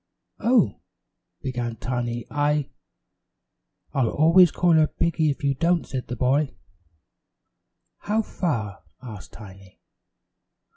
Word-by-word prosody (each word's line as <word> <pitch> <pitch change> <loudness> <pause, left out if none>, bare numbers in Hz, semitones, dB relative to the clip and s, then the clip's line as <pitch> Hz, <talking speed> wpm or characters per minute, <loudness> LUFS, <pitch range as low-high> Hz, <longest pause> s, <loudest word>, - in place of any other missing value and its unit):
"Oh 230 - +2 0.3
" - - -56
began 120 -3 -3
Tiny, 120 0 -3
"I 145 0 0 0.6
" - - -49
"I'll 130 -6 +1
always 165 +4 +5
call 175 -1 +2
her 155 -1 +5
Piggy 165 -1 0
if 145 +2 -3
you 140 -1 +2
don't," 170 +4 +1
said 130 -2 -5
the 125 - -4
boy. 135 +4 +1 1.4
"How 220 +2 0
far?" 110 - -3 0.2
asked 110 -6 -10
Tiny. 95 -3 -13
140 Hz, 115 wpm, -24 LUFS, 120-165 Hz, 1.4 s, always